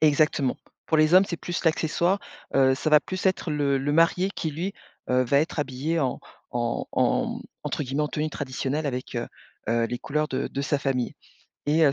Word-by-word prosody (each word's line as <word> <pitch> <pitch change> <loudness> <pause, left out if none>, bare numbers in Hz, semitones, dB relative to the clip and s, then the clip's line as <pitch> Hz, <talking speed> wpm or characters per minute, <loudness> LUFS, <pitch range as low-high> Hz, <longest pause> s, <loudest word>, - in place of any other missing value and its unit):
exactement. 150 -3 +3 0.3
Pour 160 - +2
les 155 +3 +5
hommes 190 +1 +8
c'est 170 - -3
plus 175 0 -4
l'accessoire, 170 +4 +2 0.4
heu, 130 -1 +5
ça 155 +3 -1
va 150 -1 +7
plus 185 +5 -5
être 185 -3 +1
le 140 -2 +1
le 145 +2 -1
marié 165 +4 +3
qui 160 -5 -3
lui, 175 +7 -3 0.4
heu, 125 0 +4
va 140 +3 +3
être 160 +1 -2
habillé 145 +3 -1
en 130 -3 -1 0.3
en 120 -1 -1
en, - - +2
mmh, - - -11 0.2
entre - - -2
guillemets 135 +3 -1
en 150 - 0
«tenue 155 +1 -1
traditionnelle» 140 +2 -2
avec, 130 -2 -4
heu 120 - -2 0.4
heu, 115 0 +2
les 120 +1 -4
couleurs 150 +4 -1
de 135 +1 -2
de 140 - -4
sa 140 +1 +1
famille, 130 -3 -1 0.5
et 155 +2 +4
heu, 140 - +4
145 Hz, 205 wpm, -26 LUFS, 130-160 Hz, 0.5 s, hommes